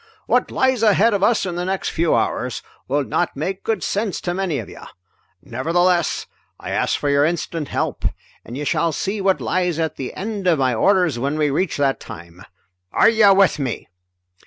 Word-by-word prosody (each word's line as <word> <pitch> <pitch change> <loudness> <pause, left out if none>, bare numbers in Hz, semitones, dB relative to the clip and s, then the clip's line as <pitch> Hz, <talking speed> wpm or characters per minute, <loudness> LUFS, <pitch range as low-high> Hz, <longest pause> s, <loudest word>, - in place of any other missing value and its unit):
"What - - +1
lies 260 -3 +1
ahead 220 +1 +4
of 200 - 0
us 220 +1 +2
in 175 -2 -4
the 175 - -2
next 190 +1 -2
few 165 -1 +1
hours 125 -1 -1 0.2
will 145 +2 +1
not - - -1
make 190 +6 -3
good 220 -4 -1
sense 205 -1 -1
to 175 - -2
many 185 -5 -1
of 115 - -5
you. - - -12 0.6
Nevertheless 175 0 0 0.3
I - - -6
ask - - 0
for 145 - -2
your 140 0 +3
instant 165 -1 -2
help, - - -3 0.4
and 120 - -8
you 145 - -4
shall 165 +3 +1
see 200 +6 -2
what 190 -1 +2
lies 180 -3 -1
at 160 -2 -2
the 130 - -6
end 200 -1 -4
of 170 -3 +4
my 130 -2 +1
orders 180 - +2
when 140 +4 -1
we 150 -2 +1
reach 185 +7 -1
that 140 -2 +1
time. 85 +1 -11 0.5
Are - - +5
you 220 -3 +5
with 195 -5 +3
me?" 130 -5 -4
175 Hz, 195 wpm, -20 LUFS, 145-195 Hz, 0.6 s, Are